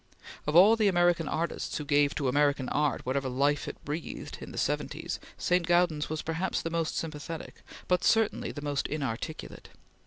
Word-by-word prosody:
Of 150 - 0
all 200 +6 +8
the 220 -2 +2
American 175 -3 +3
artists 170 +1 -2
who 150 - -5
gave 145 0 +3
to 140 - -1
American 140 -1 +2
art 150 -1 0
whatever 130 +1 -1
life 140 +3 +1
it - - -6
breathed 150 +3 -5
in - - -8
the - - -9
seventies, - - -2 0.2
St. 180 -1 +1
Gaudens 175 -4 +2
was 155 0 -3
perhaps 165 +3 -1
the 165 - -3
most 165 -2 -1
sympathetic, 160 0 -6 0.3
but 180 0 +2
certainly 225 -1 +2
the 145 - -7
most 145 -1 -1
inarticulate. 145 +1 -5
155 Hz, 175 wpm, -29 LUFS, 145-175 Hz, 0.3 s, all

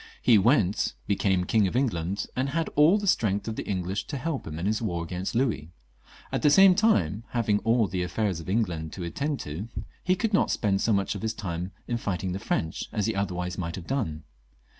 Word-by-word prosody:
He 115 -4 +5
went, 105 -2 +2
became 95 -2 +1
King 105 +2 +2
of 95 - -4
England, 100 -7 0
and 130 +2 0
had 165 +3 -1
all 155 +7 +5
the 205 - -3
strength 105 - +1
of 110 - -3
the - - -5
English 95 +1 -2
to 140 - -4
help 140 +1 -3
him 80 -1 -5
in 85 - -3
his 110 +2 0
war 85 -7 -2
against 90 +5 -4
Louis. 115 - 0 0.6
At - - -1
the 150 - +5
same 190 +5 +8
time, 110 - +2
having 110 -4 +2
all 115 +1 +2
the 95 -2 -2
affairs 90 0 -1
of 85 - -8
England 90 -7 -1
to 90 - -6
attend 140 - -2
to, 80 +9 -5 0.4
he 185 0 +3
could 220 +2 -1
not 195 - +3
spend 100 -3 +1
so 115 - +2
much 100 -2 +1
of 100 - -6
his 110 0 -2
time 90 -3 -4 0.2
in 120 - -1
fighting 95 -4 -2
the 95 - -3
French 80 -4 -2
as 105 -3 -1
he 110 - 0
otherwise 90 -3 -2
might 85 -1 -3
have 95 - -8
done. 95 - -2
100 Hz, 220 wpm, -27 LUFS, 90-120 Hz, 0.6 s, same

